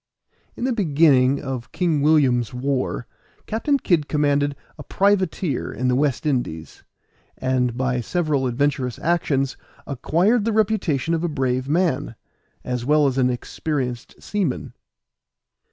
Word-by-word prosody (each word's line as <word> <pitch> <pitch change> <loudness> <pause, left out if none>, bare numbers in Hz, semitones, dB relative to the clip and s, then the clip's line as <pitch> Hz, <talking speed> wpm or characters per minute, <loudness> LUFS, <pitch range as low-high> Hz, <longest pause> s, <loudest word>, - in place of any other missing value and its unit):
In - - -6
the 255 0 +1
beginning 145 - +3
of 130 -4 -5
King 170 -5 0
William's 135 -6 +3
war, 130 -1 -2 0.4
Captain 255 +6 0
Kid 170 - +1
commanded 145 -1 +1 0.2
a - - -6
privateer 190 -6 0
in 125 0 -1
the 125 - +2
West 140 +1 0
Indies, 120 - -3 0.5
and 125 -2 0
by 130 -1 0
several 150 -2 0
adventurous 130 0 -1
actions 140 -6 0 0.3
acquired 180 - +1
the 225 +1 0
reputation 195 -9 +1
of 165 0 0
a 175 - 0
brave 130 -2 -1
man, 160 -7 0 0.5
as 125 -1 -3
well 150 +3 +3
as 135 -1 +1
an 125 -1 +3
experienced 125 0 -4
seaman. 190 -11 -2
140 Hz, 130 wpm, -22 LUFS, 130-170 Hz, 0.5 s, beginning